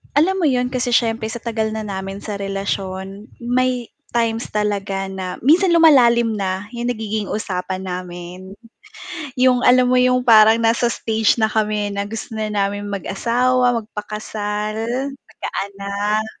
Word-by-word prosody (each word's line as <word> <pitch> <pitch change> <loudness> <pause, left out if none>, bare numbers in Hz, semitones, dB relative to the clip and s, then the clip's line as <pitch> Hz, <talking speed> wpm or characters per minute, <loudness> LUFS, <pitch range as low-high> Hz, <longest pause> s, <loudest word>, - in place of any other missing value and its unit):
Alam 365 +5 +2
mo - - +4
yun 250 -2 +1
kasi 250 -1 -2
siyempre 225 -2 +1
sa 235 - -5
tagal 220 -2 -1
na 220 0 -3
namin 195 0 -5
sa 205 0 -5
relasyon, 195 0 -4
may 245 0 0 0.3
times 230 -1 0
talaga 195 -2 -1
na 185 -1 -6
minsan 340 - +4
lumalalim 235 -9 +5
na 190 +1 -3
'yong 240 -1 -4
nagiging 215 -3 -3
usapan 190 -2 -3
namin, 180 +1 -7 0.8
yung 250 -1 +4
alam 250 0 +6
mo 255 - +4
yung 250 0 +3
parang 220 -2 +7
nasa 230 +1 +3
stage 220 -2 +1
na 220 - +3
kami 210 -1 0
na 200 0 -3
gusto 225 0 -6
na 215 - -1
namin 205 0 -1
mag-asawa, 245 +5 +1
magpakasal, 210 0 -4 0.5
magkaanak 200 +1 -3
215 Hz, 140 wpm, -20 LUFS, 200-240 Hz, 0.8 s, parang